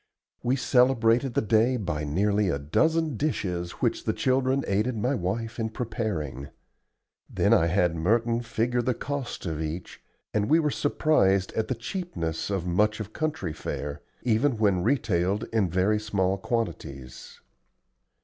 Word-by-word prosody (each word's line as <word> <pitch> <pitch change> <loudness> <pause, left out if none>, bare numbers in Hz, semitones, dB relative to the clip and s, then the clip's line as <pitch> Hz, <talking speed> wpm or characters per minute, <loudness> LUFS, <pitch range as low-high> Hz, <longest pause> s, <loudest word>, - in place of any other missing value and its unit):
We 125 +2 +1
celebrated 125 -1 +3
the - - +2
day 115 +4 +3
by 75 -8 -3
nearly 100 +6 +1
a 70 - 0
dozen 155 - +1
dishes 90 - -2
which - - 0
the - - +1
children 130 +1 +1
aided 110 +5 0
my 125 +6 0
wife 115 +2 -3
in 110 -1 -1
preparing. 85 - -4 0.8
Then - - +2
I 80 - +4
had 90 -1 +2
Merton 115 +7 +1
figure 120 +1 0
the 125 0 0
cost 140 -5 -4
of 80 -3 -3
each, 80 +3 -5 0.3
and 105 +1 0
we 160 - +6
were 150 -2 +1
surprised 100 -12 +2
at 110 - -1
the 130 - -1
cheapness 110 - -4
of 95 -3 -1
much 105 +5 +1
of 110 0 -6
country 155 - -2
fare, 75 -2 -5 0.2
even 120 +2 +2
when 100 -4 +2
retailed 100 -4 +1
in 105 -5 +2
very 95 +5 +2
small 100 -3 0
quantities. 70 - -4
110 Hz, 150 wpm, -27 LUFS, 90-125 Hz, 0.8 s, we